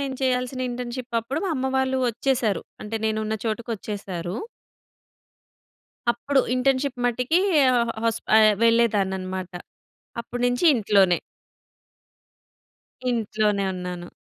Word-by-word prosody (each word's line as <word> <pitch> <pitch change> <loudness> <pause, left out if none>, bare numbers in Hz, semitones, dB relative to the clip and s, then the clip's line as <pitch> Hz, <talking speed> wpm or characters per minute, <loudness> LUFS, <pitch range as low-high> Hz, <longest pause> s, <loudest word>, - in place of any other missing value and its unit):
నేను 275 -1 -3
చేయాల్సిన 255 0 0
ఇంటర్న్‌షిప్ 245 0 -4
అప్పుడు, 260 +6 -4
మా 380 - -1
అమ్మ 260 0 -1
వాళ్ళు 265 0 +1
ఒచ్చేసారు. 235 -3 0 0.2
అంటే 220 +2 -4
నేను 220 0 0
ఉన్న 215 0 -2
చోటుకొచ్చేసారు. 205 -6 -4 1.8
అప్పుడు 270 +4 +1
ఇంటర్న్‌షిప్ 265 +1 +1
మట్టికి 250 +7 +2 0.4
ఆహ్, 235 -1 +2
హాస్ప 230 0 0
ఆహ్, 215 -1 +6
వెళ్ళేదాన్ని 230 -4 +3
అన్నమాట. 185 0 -5 0.7
అప్పటి 245 +1 -5
నుంచి 245 +5 0
ఇంట్లోనే. 195 -6 +3 1.9
ఇంట్లోనే 215 -3 0
ఉన్నాను. 180 -1 -6
230 Hz, 105 wpm, -24 LUFS, 205-250 Hz, 1.9 s, ఆహ్